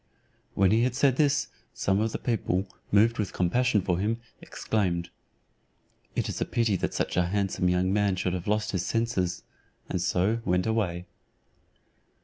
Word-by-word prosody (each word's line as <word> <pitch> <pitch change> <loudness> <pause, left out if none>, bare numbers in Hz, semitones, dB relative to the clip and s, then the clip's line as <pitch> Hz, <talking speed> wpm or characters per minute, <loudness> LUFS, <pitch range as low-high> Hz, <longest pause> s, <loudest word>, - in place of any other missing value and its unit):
When 95 -1 +4
he 110 +2 +4
had 125 0 +1
said 135 -1 +3
this, 145 -2 +2 0.3
some 95 0 +1
of 110 +1 0
the - - -2
people, 100 -5 -1 0.2
moved 110 +3 +4
with 105 - -2
compassion 110 +5 +2
for 90 -1 0
him, 110 +4 0 0.2
exclaimed, 85 -5 -2 1.0
"It - - 0
is - - -4
a - - +2
pity 115 -4 +1
that - - -3
such - - -1
a 90 -1 +3
handsome 95 -1 0
young 90 +1 +1
man 100 -2 +2
should 90 -1 -1
have 90 0 -4
lost 105 +1 0
his 95 -3 -1
senses;" 115 -7 -1 0.4
and 90 - -2
so 100 +6 +1
went 90 -2 +1
away. 95 -6 -1
100 Hz, 165 wpm, -27 LUFS, 90-115 Hz, 1.0 s, When